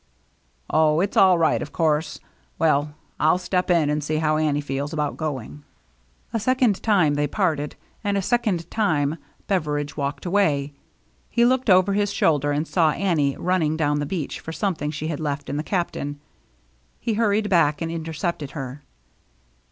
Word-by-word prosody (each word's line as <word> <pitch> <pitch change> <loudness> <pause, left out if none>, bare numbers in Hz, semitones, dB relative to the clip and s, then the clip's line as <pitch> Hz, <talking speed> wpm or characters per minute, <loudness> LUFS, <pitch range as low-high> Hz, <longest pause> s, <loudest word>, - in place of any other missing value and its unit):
"Oh, 155 0 +3
it's 195 +3 -1
all 185 -2 +6
right, 165 -1 +2
of 150 - -6
course; 160 -1 0 0.4
well, 150 -2 +1 0.2
I'll 155 +3 +4
step 180 0 -1
in 170 -4 +3
and 150 0 0
see 155 +2 -2
how 155 0 +1
Annie 150 -2 +1
feels 145 +1 -3
about 150 -2 -1
going." 145 -2 -5 0.7
A 225 - +1
second 245 -3 +2
time 185 -9 +3
they 145 0 0
parted, 155 -7 -1 0.3
and 200 -1 0
a - - +1
second 205 -8 0
time 155 -8 0 0.3
Beveridge 150 -6 -1
walked 140 +2 -3
away. 155 -7 +1 0.6
He 235 0 +3
looked 255 -1 +2
over 185 +1 +5
his 205 0 +1
shoulder, 145 -6 +2
and 150 +2 -1
saw 165 -4 +3
Annie 155 -8 0
running 165 -4 0
down 145 -2 +1
the 145 - -2
beach 160 -3 -4
for 160 - -7
something 165 -5 -2
she 150 0 -5
had 150 - -3
left 145 -2 -3
in 145 - -2
the - - 0
Captain. 150 -6 -3 0.8
He 230 - -1
hurried 210 -1 +1
back 165 -6 +3
and 165 -1 -3
intercepted 160 -2 -3
her. 135 +1 -6
160 Hz, 165 wpm, -23 LUFS, 145-185 Hz, 0.8 s, all